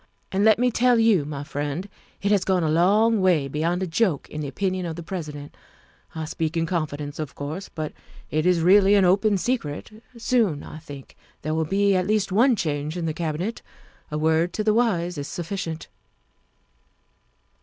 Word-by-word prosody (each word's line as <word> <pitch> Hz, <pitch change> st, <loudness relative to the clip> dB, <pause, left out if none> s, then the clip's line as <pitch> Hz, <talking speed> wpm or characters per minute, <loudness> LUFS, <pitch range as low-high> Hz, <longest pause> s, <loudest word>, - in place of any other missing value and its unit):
And 195 Hz, +1 st, +1 dB
let 220 Hz, 0 st, +6 dB
me 250 Hz, +1 st, +2 dB
tell 245 Hz, +1 st, +3 dB
you, 220 Hz, -9 st, +4 dB
my 145 Hz, -1 st, -5 dB
friend, 145 Hz, +6 st, -4 dB, 0.4 s
it 200 Hz, -, +2 dB
has 205 Hz, -3 st, +3 dB
gone 185 Hz, -2 st, +1 dB
a 155 Hz, -, +1 dB
long 205 Hz, +6 st, +4 dB
way 170 Hz, -7 st, +3 dB
beyond 165 Hz, +6 st, -1 dB
a -, -, 0 dB
joke 175 Hz, -3 st, 0 dB
in 155 Hz, -, -4 dB
the 145 Hz, -, -3 dB
opinion 185 Hz, +3 st, -2 dB
of 160 Hz, -, -4 dB
the 170 Hz, -, -7 dB
President. 150 Hz, -5 st, -6 dB, 0.6 s
I 160 Hz, -1 st, -3 dB
speak 160 Hz, 0 st, -2 dB
in 165 Hz, -, +1 dB
confidence, 150 Hz, -4 st, -3 dB
of 150 Hz, -3 st, -5 dB
course, 155 Hz, +7 st, -5 dB
but 155 Hz, -2 st, -5 dB, 0.4 s
it 155 Hz, +3 st, +1 dB
is 180 Hz, -2 st, +3 dB
really 195 Hz, +3 st, +6 dB
an 195 Hz, -2 st, +5 dB
open 200 Hz, +3 st, +3 dB
secret. 190 Hz, -, -2 dB, 0.3 s
Soon, 225 Hz, -, +1 dB
I 155 Hz, -, -9 dB
think, 145 Hz, -3 st, -11 dB, 0.3 s
there 155 Hz, +1 st, -1 dB
will 160 Hz, 0 st, 0 dB
be 200 Hz, +3 st, +2 dB
at 185 Hz, 0 st, +1 dB
least 210 Hz, -2 st, +1 dB
one 240 Hz, +6 st, +4 dB
change 155 Hz, -2 st, -2 dB
in 170 Hz, -, -2 dB
the 160 Hz, -, -1 dB
Cabinet. 170 Hz, +7 st, -3 dB, 0.5 s
A 150 Hz, -, -3 dB
word 160 Hz, +3 st, +2 dB
to 215 Hz, -, -1 dB
the 215 Hz, 0 st, +3 dB
wise 180 Hz, -8 st, +1 dB
is 140 Hz, -, -4 dB
sufficient." 170 Hz, -2 st, -5 dB
175 Hz, 185 wpm, -24 LUFS, 155-200 Hz, 0.6 s, let